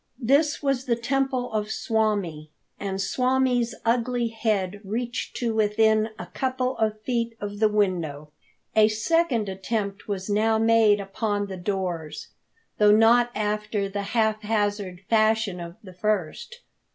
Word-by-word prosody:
This 290 +5 +2
was 275 -2 0
the 240 -3 +1
temple 255 0 -1
swami, 205 -10 -1 0.3
and 195 -1 -3
swami's 250 +1 +1
ugly 240 0 +1
head 205 -4 -1
reached 235 +4 -4
to 235 -2 -1
within 220 0 +2
a - - -6
couple 255 0 -2
of 215 -1 0
feet 235 -1 -2
of 205 0 -6
the 215 -1 +4
window. 170 -8 -1 0.4
A 215 -1 +6
second 235 +1 +1
attempt 200 +1 -3
was 195 -2 -3
now 220 +2 +2
made 225 -2 +4
upon 205 +1 -2
the 195 -1 -6
doors, 175 -4 -4 0.5
though 210 0 +6
not 235 +2 +5
after 210 -1 -1
the 200 +1 -4 0.2
haphazard 210 -4 0
fashion 220 -4 +2
of 170 0 -8
the 185 -2 -11
first. 210 - -2
215 Hz, 130 wpm, -25 LUFS, 200-235 Hz, 0.5 s, A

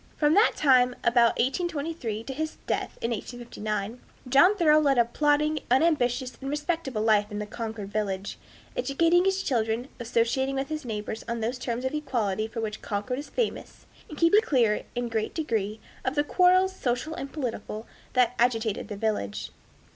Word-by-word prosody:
From 295 0 +3
that 420 +6 +5
time, 250 -3 +4
about 235 -1 +4
1823, 285 - -2
till 270 +2 -6
his 315 +2 -3
death - - -2
in 230 - 0
1859, 220 -1 -4 0.3
John 280 +11 +6
Thoreau 310 -4 +5
led 280 -3 +3
a 235 - +5
plodding, 295 +4 +1
unambitious, 255 -2 +2
and 270 - -4
respectable 295 -6 -2
life 210 -1 +3
in 210 0 -3
Concord 220 -2 -6
village, 200 -2 -3 0.4
educating 340 - +3
his 385 0 +1
children, 230 0 -1
associating 240 +3 0
with 270 0 -2
his 310 -3 -4
neighbors 215 -1 -4
on 235 0 -2
those 240 +3 -2
terms 245 0 -3
of 260 - -1
equality 230 -8 -1
for 225 +1 -5
which 215 -1 -4
Concord 215 +5 -3
is 290 - -8
famous, 475 -3 -3 0.2
and 305 - -9
keeping 335 +7 +5
clear, 235 - +1
in 245 0 -1
a - - -4
great 220 -1 -2
degree, 220 - -2 0.2
of 260 - -1
the 290 - +3
quarrels, 370 +4 +4
social 250 +2 -2
and 275 -3 -6
political, 230 -6 -4 0.3
that 250 -2 +3
agitated 225 -3 +1
the 205 - -6
village. 205 - -2
250 Hz, 170 wpm, -27 LUFS, 220-300 Hz, 0.4 s, John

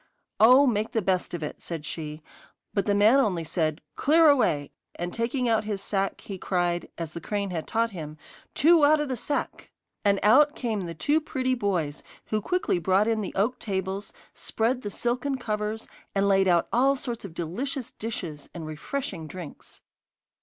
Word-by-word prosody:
'Oh, 255 +6 +8
make 220 -4 0
the 225 - +1
best 185 -1 0
of 165 - -5
it,' 150 - -6
said 165 -3 -5
she, 150 0 -6 0.5
but 200 -2 0
the 205 - +3
man 215 +6 +6
only 185 -10 +1
said: 155 -1 -1
'Clear 315 +2 +5
away!' 155 - +1 0.2
and 175 +1 -4
taking 245 +2 -1
out 225 -2 +2
his 210 -2 -2
sack 195 0 -2
he 195 -2 -7
cried, 175 -2 -1
as 165 -2 -4
the 170 - -6
crane 200 -2 -2
had 165 -3 -4
taught 230 0 0
him: 155 -5 -7 0.4
'Two 325 +1 +5
out 300 +1 +6
of 295 -2 -2
the 260 - -1
sack!' 285 +5 -3 0.3
And 200 -1 +3
out 290 +8 +6
came 215 -7 -2
the 165 - -6
two 295 - +2
pretty 260 -4 -1
boys, 180 - -1 0.2
who 215 0 -1
quickly 360 - 0
brought 190 +4 +2
in 225 -1 +1
the 200 - -5
oak 220 +6 +1
tables, 190 -1 -3 0.2
spread 245 +3 -1
the 205 - -4
silken 250 +5 -1
covers, 215 -2 -3 0.3
and 200 0 +2
laid 195 -1 +4
out 175 -2 +3
all 270 +4 +4
sorts 240 -3 -5
of 185 -5 -9
delicious 240 - -3
dishes 175 -9 -6
and 165 -2 -6
refreshing 165 - -5
drinks. 175 -1 -10
205 Hz, 180 wpm, -26 LUFS, 175-245 Hz, 0.5 s, Oh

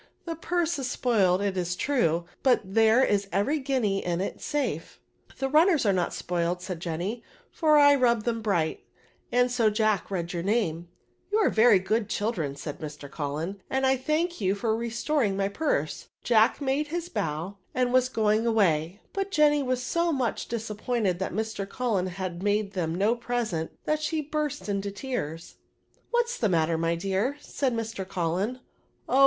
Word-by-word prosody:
The 335 - -3
purse 340 -1 -1
is 260 -2 -2
spoiled, 200 -8 +2
it 200 -2 -1
is 180 -1 -1
true, 175 - +1 0.2
but 260 -2 +4
there 225 +5 +4
is 200 -4 +1
every 205 - +1
guinea 255 -8 0
in 175 -1 -1
it 195 - -4
safe." 295 -1 -3 0.2
" - - -25
The 270 - -1
runners 310 - +4
are 200 - +4
not 180 -2 0
spoiled," 175 0 -1
said 185 -3 -5
Jenny, 175 +6 -3
^' - - -21 0.3
for 310 -2 +4
I 285 -1 +7
rubbed 235 -5 +2
them 230 -1 -1
bright^ 175 -7 0 0.5
and 245 0 +3
so 235 -3 +3
Jack 215 -2 +1
read 175 -2 -3
your 170 - -2
name." 175 -5 0 0.2
" - - -42
You 420 - +3
ard 435 - +3
very 220 -1 +6
good 215 +3 -1
children," 205 -12 -1
said 145 +1 -6
Mr. 150 -2 -8
Cullen, 155 +7 -4
" - - -40
and 265 0 +1
I 265 0 +4
thank 310 +4 -1
you 190 0 +2
for 220 +1 0
restoring 235 -1 0
my 195 0 +1
purse. 200 - -1 0.2
Jack 225 0 +4
made 280 +1 0
his 340 +2 -3
bow, 170 - -3 0.2
and 250 -1 +1
was 255 0 +4
going 220 -1 +1
away; 185 -4 +1
but 390 0 -2
Jenny 295 -5 +4
was 255 -2 -1
so 335 +5 +1
much 260 -6 -1
dis 225 -1 -4
appointed 210 -4 -1
that 190 - -2
Mr. 215 -1 -3
Cullen 215 -7 0
had 180 -1 -5
made 205 0 0
them 170 -2 -2
ntf 220 +5 +2
present, 225 -10 -2 0.2
that 305 0 0
she 310 +1 -1
burst 300 -2 -3
into 200 0 -1
tears. 195 - -5 0.3
" - - -39
What's 480 0 0
the 220 - +2
matter, 165 -2 +2
my 165 0 +1
dear," 195 +10 -1
said 270 -4 -2
Mr. 225 -3 -3
Cullen. 185 +4 -1
*^ - - -19 0.5
Oh 265 - +2
220 Hz, 190 wpm, -27 LUFS, 185-265 Hz, 0.5 s, I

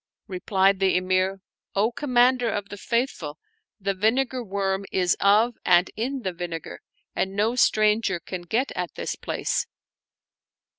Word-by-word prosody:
Replied 190 0 +1
the 190 -1 +3
Emir^ 185 +1 0 0.2
" - - -53
O 210 +4 +2
Commander 250 -2 +2
of 205 -2 -3
the 205 - -7
Faithful, 215 - -2 0.4
the 195 0 -1
vinegar 245 +6 +1
worm 195 -1 -1
is 180 -2 +2
of 215 +4 +4
and 175 0 +4
in 255 +3 -3
the 185 - -2
vinegar,, 170 -2 -6 0.4
and 190 +1 -1
no 215 +3 +2
stranger 215 -5 +3
can 180 +1 -6
get 230 +10 -1
at 180 -2 -4
this - - -3
place." - - -2
200 Hz, 145 wpm, -25 LUFS, 185-235 Hz, 0.4 s, of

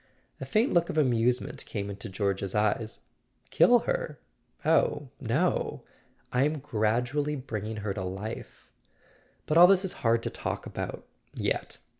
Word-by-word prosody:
A - - -5
faint 225 +4 +2
look 170 -1 +3
of - - -3
amusement 125 -3 +1
came 100 -2 -3
into 100 0 -7
George's 100 0 -2
eyes. 105 +1 0 0.5
"Kill 245 - +6
her? - - -2 0.5
Oh, 145 -3 +2
no. 140 +9 0 0.5
I'm 145 +5 +2
gradually 130 +3 0
bringing 110 -5 -5
her 100 - 0
to 95 - -4
life. 95 +5 -7 0.7
But 155 +2 +3
all 175 - +11
this 195 0 +4
is 185 - -2
hard 115 0 +2
to - - -3
talk - - -4
about—yet. - - -5
120 Hz, 135 wpm, -28 LUFS, 105-150 Hz, 0.7 s, all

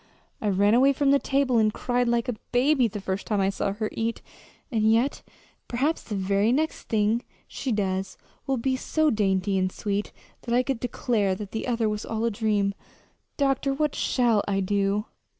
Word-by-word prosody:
I 210 - 0
ran 200 +2 +3
away 270 +4 +5
from 275 0 +2
the 280 - +5
table 270 -4 +1
and 215 -1 +3
cried 245 +2 0
like 235 +1 +1
a 245 - -1 0.2
baby 255 +1 +3
the 210 -1 -6
first 190 0 -4
time 210 -2 0
I 195 0 +2
saw 195 0 -2
her 215 +1 -2
eat; 230 0 -3 0.5
and 220 -2 +3
yet 240 +5 +1 0.5
perhaps 280 +7 0
the 210 - -5
very 200 +3 +1
next 310 +5 -1
thing 220 +1 +2 0.3
she 265 - -4
does 190 -3 -1 0.3
will 270 -1 +1
be 260 +2 0
so 310 +3 +1
dainty 195 -2 +1
and 185 0 0
sweet 205 +1 -3 0.3
that 235 -1 -1
I 250 - +4
could 265 -3 -2
declare 230 -5 0
the 210 +4 -5
other 230 -2 +1
was 210 0 -2
all 225 0 -2
a 235 - +1
dream. 205 -2 0 0.6
Doctor, 275 -1 +1
what 300 0 0
shall 235 -5 +2
I 200 -1 +1
do?" 200 +2 0
225 Hz, 185 wpm, -26 LUFS, 200-255 Hz, 0.6 s, away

